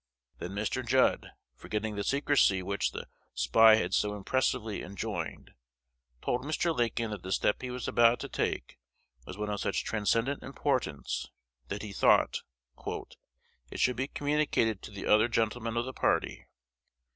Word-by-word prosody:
Then 90 Hz, -, -5 dB
Mr. 110 Hz, +5 st, -2 dB
Judd, 130 Hz, +2 st, +2 dB, 0.2 s
forgetting 105 Hz, 0 st, -4 dB
the 100 Hz, -, -2 dB
secrecy 140 Hz, -9 st, +3 dB
which 100 Hz, +2 st, 0 dB
the -, -, -7 dB, 0.3 s
spy 110 Hz, -, +6 dB
had 110 Hz, -, -1 dB
so 105 Hz, 0 st, +1 dB
impressively 110 Hz, 0 st, -1 dB
enjoined, 95 Hz, 0 st, -5 dB, 0.7 s
told 125 Hz, -, 0 dB
Mr. 155 Hz, +3 st, 0 dB
Lincoln 115 Hz, -2 st, 0 dB
that 105 Hz, -3 st, -5 dB
the 95 Hz, -, -7 dB
step 105 Hz, -, +1 dB
he 125 Hz, -, -4 dB
was 125 Hz, 0 st, -4 dB
about 120 Hz, 0 st, +4 dB
to -, -, -4 dB
take -, -, -3 dB, 0.5 s
was 95 Hz, -, -7 dB
one 105 Hz, 0 st, -3 dB
of 105 Hz, -, -2 dB
such -, -, -1 dB
transcendent 115 Hz, +5 st, 0 dB
importance, 130 Hz, -, -2 dB, 0.4 s
that 105 Hz, +2 st, -4 dB
he 105 Hz, -2 st, -6 dB
thought -, -, +3 dB, 1.3 s
"it -, -, -7 dB
should 125 Hz, -, +3 dB
be 130 Hz, +2 st, -2 dB
communicated 145 Hz, -9 st, 0 dB
to -, -, -8 dB
the 100 Hz, -2 st, -7 dB
other 110 Hz, +2 st, +5 dB
gentlemen 115 Hz, 0 st, -1 dB
of 120 Hz, -, 0 dB
the 130 Hz, -, -6 dB
party." -, -, 0 dB
110 Hz, 155 wpm, -30 LUFS, 105-125 Hz, 1.3 s, spy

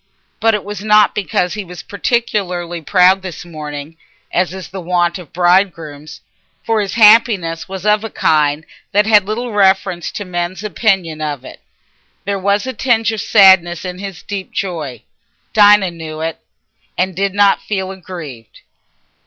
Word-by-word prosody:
But 225 Hz, -1 st, +3 dB
it 210 Hz, -, -4 dB
was 205 Hz, -1 st, -7 dB
not 210 Hz, -1 st, +4 dB
because 180 Hz, -3 st, -1 dB
he 210 Hz, -1 st, -4 dB
was 175 Hz, -4 st, -10 dB
particularly 185 Hz, -7 st, -2 dB
proud 185 Hz, +3 st, +4 dB
this 185 Hz, -2 st, -8 dB
morning, 150 Hz, -1 st, -8 dB, 0.4 s
as 180 Hz, 0 st, +1 dB
is 190 Hz, -1 st, -8 dB
the 190 Hz, 0 st, -7 dB
wont 175 Hz, 0 st, 0 dB
of 170 Hz, -5 st, -13 dB
bridegrooms, 175 Hz, -5 st, 0 dB, 0.4 s
for 225 Hz, -1 st, +1 dB
his 200 Hz, 0 st, -4 dB
happiness 210 Hz, -7 st, +4 dB
was 190 Hz, 0 st, -7 dB
of 210 Hz, 0 st, +2 dB
a 225 Hz, -, -4 dB
kind 155 Hz, -3 st, +1 dB, 0.3 s
that 205 Hz, +1 st, +3 dB
had 210 Hz, -3 st, +4 dB
little 235 Hz, +3 st, -3 dB
reference 190 Hz, -3 st, +1 dB
to 205 Hz, -, -5 dB
men's 175 Hz, +2 st, -4 dB
opinion 185 Hz, -5 st, 0 dB
of 145 Hz, -4 st, -4 dB
it. -, -, -12 dB, 0.6 s
There 200 Hz, 0 st, -2 dB
was 200 Hz, +3 st, 0 dB
a 260 Hz, -, -4 dB
tinge 225 Hz, -2 st, +1 dB
of 220 Hz, -, -3 dB
sadness 190 Hz, -4 st, +4 dB
in 180 Hz, 0 st, -6 dB
his 195 Hz, -3 st, -8 dB
deep 200 Hz, -2 st, -6 dB
joy; 155 Hz, -, -4 dB, 0.5 s
Dinah 205 Hz, -3 st, +5 dB
knew 160 Hz, -2 st, -8 dB
it, 165 Hz, 0 st, -3 dB, 0.6 s
and 185 Hz, 0 st, -1 dB
did 195 Hz, +1 st, -1 dB
not 205 Hz, -1 st, +3 dB
feel 190 Hz, -2 st, -3 dB
aggrieved. 165 Hz, -, -10 dB
190 Hz, 160 wpm, -16 LUFS, 170-205 Hz, 0.6 s, Dinah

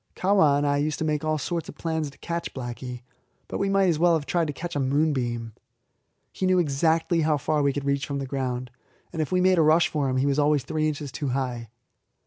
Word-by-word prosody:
Kahwa 185 Hz, -7 st, +3 dB
and 145 Hz, -, 0 dB
I 145 Hz, 0 st, +2 dB
used 150 Hz, +1 st, -1 dB
to 160 Hz, -, -2 dB
make 150 Hz, -1 st, -1 dB
all 155 Hz, 0 st, 0 dB
sorts 170 Hz, +3 st, -3 dB
of -, -, -10 dB
plans 160 Hz, -2 st, -2 dB
to 140 Hz, -, -18 dB
catch 170 Hz, 0 st, -4 dB
Blacky, 125 Hz, -1 st, -6 dB, 0.4 s
but -, -, -4 dB
we 195 Hz, -, 0 dB
might 195 Hz, -1 st, +3 dB
as 165 Hz, -4 st, +1 dB
well 170 Hz, 0 st, +4 dB
have 150 Hz, -3 st, -2 dB
tried 165 Hz, +3 st, 0 dB
to -, -, -2 dB
catch 170 Hz, +4 st, -6 dB
a -, -, 0 dB
moonbeam. 130 Hz, -5 st, 0 dB, 0.8 s
He 185 Hz, -, -2 dB
knew 185 Hz, 0 st, +3 dB
exactly 165 Hz, +2 st, +2 dB
how 155 Hz, -1 st, +2 dB
far 150 Hz, +2 st, 0 dB
we 140 Hz, -1 st, +3 dB
could 140 Hz, 0 st, -4 dB
reach 140 Hz, 0 st, 0 dB
from 140 Hz, -, -3 dB
the 135 Hz, -, -3 dB
ground, 130 Hz, -2 st, -3 dB, 0.4 s
and 160 Hz, -, -1 dB
if 155 Hz, -, -3 dB
we 185 Hz, 0 st, +2 dB
made 185 Hz, -1 st, +4 dB
a -, -, +6 dB
rush 160 Hz, +2 st, +4 dB
for 145 Hz, -3 st, -1 dB
him 130 Hz, -, 0 dB
he 130 Hz, -, +2 dB
was 140 Hz, +1 st, +1 dB
always 145 Hz, -2 st, +3 dB
three 155 Hz, +2 st, -1 dB
inches 145 Hz, -2 st, -4 dB
too 145 Hz, -, -4 dB
high. 125 Hz, -3 st, -3 dB
150 Hz, 245 wpm, -25 LUFS, 135-165 Hz, 0.8 s, a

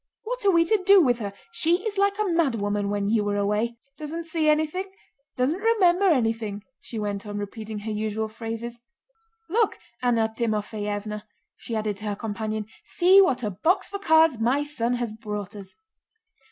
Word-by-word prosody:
What -, -, -4 dB
are -, -, +6 dB
we 335 Hz, -3 st, +4 dB
to 425 Hz, +3 st, +2 dB
do 395 Hz, +1 st, +7 dB
with 250 Hz, -8 st, +3 dB
her? 205 Hz, -3 st, -4 dB, 0.2 s
She 345 Hz, +3 st, +1 dB
is 410 Hz, -2 st, -2 dB
like 400 Hz, 0 st, +2 dB
a 425 Hz, -, +1 dB
mad 330 Hz, -8 st, +2 dB
woman 205 Hz, -1 st, -1 dB
when 205 Hz, 0 st, -1 dB
you 210 Hz, -1 st, +1 dB
are 205 Hz, -, 0 dB
away. 210 Hz, +4 st, 0 dB, 0.2 s
Doesn't 315 Hz, +2 st, -5 dB
see 320 Hz, -1 st, 0 dB
anything, 315 Hz, +5 st, 0 dB, 0.5 s
doesn't 270 Hz, +8 st, +1 dB
remember 400 Hz, -4 st, +3 dB
anything," 225 Hz, -, 0 dB, 0.2 s
she 230 Hz, -, -7 dB
went 205 Hz, -2 st, -3 dB
on, 205 Hz, 0 st, -5 dB
repeating 215 Hz, +1 st, -5 dB
her 215 Hz, +2 st, -5 dB
usual 215 Hz, +1 st, -2 dB
phrases. 230 Hz, +2 st, -6 dB, 0.7 s
"Look, 435 Hz, +4 st, +1 dB, 0.2 s
Anna 230 Hz, -3 st, +1 dB
Timoféevna," 210 Hz, -2 st, -2 dB, 0.3 s
she 230 Hz, -, -6 dB
added 215 Hz, -2 st, -2 dB
to 210 Hz, -, -8 dB
her 205 Hz, -1 st, -1 dB
companion, 215 Hz, 0 st, -3 dB, 0.2 s
"see 375 Hz, +2 st, +5 dB
what 260 Hz, -10 st, +2 dB
a 210 Hz, -, -1 dB
box 315 Hz, -, +1 dB
for 400 Hz, -, -5 dB
cards 320 Hz, -, +4 dB
my 250 Hz, +6 st, +2 dB
son 245 Hz, -5 st, -2 dB
has 240 Hz, -3 st, -2 dB
brought 210 Hz, -2 st, -6 dB
us!" 195 Hz, -2 st, -10 dB
230 Hz, 180 wpm, -25 LUFS, 210-330 Hz, 0.7 s, do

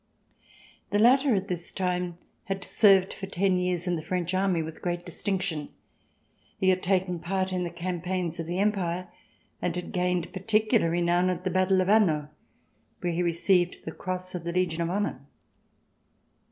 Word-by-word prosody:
The 205 Hz, -, +1 dB
latter 255 Hz, +3 st, +5 dB
at 195 Hz, 0 st, -1 dB
this 175 Hz, -2 st, -4 dB
time 180 Hz, -2 st, -2 dB, 0.3 s
had 195 Hz, -1 st, -3 dB
served 195 Hz, -1 st, +4 dB
for 195 Hz, -, -7 dB
ten 190 Hz, 0 st, +1 dB
years 180 Hz, -1 st, 0 dB
in 175 Hz, -2 st, 0 dB
the -, -, -4 dB
French 180 Hz, +2 st, -2 dB
army 185 Hz, -3 st, +1 dB
with 160 Hz, 0 st, -8 dB
great 175 Hz, -1 st, -3 dB
distinction. 180 Hz, -4 st, -2 dB, 0.9 s
He 190 Hz, -, +2 dB
had 185 Hz, 0 st, +2 dB
taken 180 Hz, -1 st, 0 dB
part 185 Hz, +2 st, -1 dB
in 180 Hz, -1 st, 0 dB
the -, -, -3 dB
campaigns 175 Hz, 0 st, -3 dB
of 165 Hz, -, -4 dB
the 175 Hz, +1 st, -2 dB
Empire 185 Hz, -3 st, 0 dB, 0.5 s
and 175 Hz, -1 st, -1 dB
had 180 Hz, -, -5 dB
gained 180 Hz, -1 st, -1 dB
particular 215 Hz, 0 st, +2 dB
renown 175 Hz, +1 st, +2 dB
at 180 Hz, -1 st, -2 dB
the 185 Hz, -, -1 dB
battle 185 Hz, +1 st, +3 dB
of 185 Hz, -, -1 dB
Hanau 170 Hz, -9 st, +3 dB, 0.7 s
where 175 Hz, -1 st, -1 dB
he 170 Hz, -, 0 dB
received 175 Hz, +1 st, +2 dB
the 160 Hz, -, -4 dB
cross 185 Hz, +2 st, -4 dB
of 180 Hz, -2 st, -5 dB
the 170 Hz, -, -3 dB
Legion 175 Hz, -2 st, 0 dB
of 170 Hz, -, 0 dB
Honor. 195 Hz, -7 st, -2 dB
180 Hz, 170 wpm, -27 LUFS, 175-190 Hz, 0.9 s, latter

